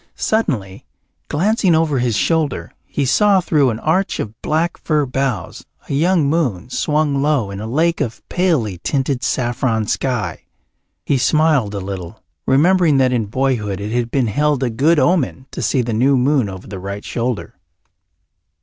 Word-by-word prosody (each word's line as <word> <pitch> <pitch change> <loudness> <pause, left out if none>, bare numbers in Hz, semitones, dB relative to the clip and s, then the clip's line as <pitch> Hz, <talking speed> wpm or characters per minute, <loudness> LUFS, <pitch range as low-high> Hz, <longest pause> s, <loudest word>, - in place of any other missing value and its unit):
Suddenly, 125 - -1 0.5
glancing 190 +2 +2
over 155 -4 +1
his 120 -3 0
shoulder, 160 +1 0
he 140 - -1
saw 195 +10 +4
through 150 -6 +2
an 110 - -2
arch 185 +5 0
of 110 +1 -6
black 165 +3 0
fir 150 -3 0
boughs 125 -9 -3 0.2
a - - -4
young 165 +1 +2
moon 130 - -1
swung 150 -1 0
low 140 -9 +1
in 100 - -6
a 110 - -5
lake 165 +8 +1
of 115 - -4
palely 145 - 0
tinted 135 - -1
saffron 120 -3 0
sky. 125 -1 -2 0.6
He 140 - +1
smiled 145 -6 +2
a - - -2
little, 95 +1 -7 0.2
remembering 165 +2 +4
that 130 -1 +3
in 115 -4 0
boyhood 110 -5 -1
it 105 +1 -5
had 120 0 -1
been 130 0 +1
held 145 +5 +1
a 125 - 0
good 150 +9 +2
omen 150 -5 +1
to - - -5
see 125 +3 +1
the 115 -1 -3
new 130 +5 +3
moon 130 -3 +2
over 95 -1 -9
the 95 -1 -7
right 100 +2 -6
shoulder. 115 -7 -3
130 Hz, 165 wpm, -18 LUFS, 110-155 Hz, 0.6 s, saw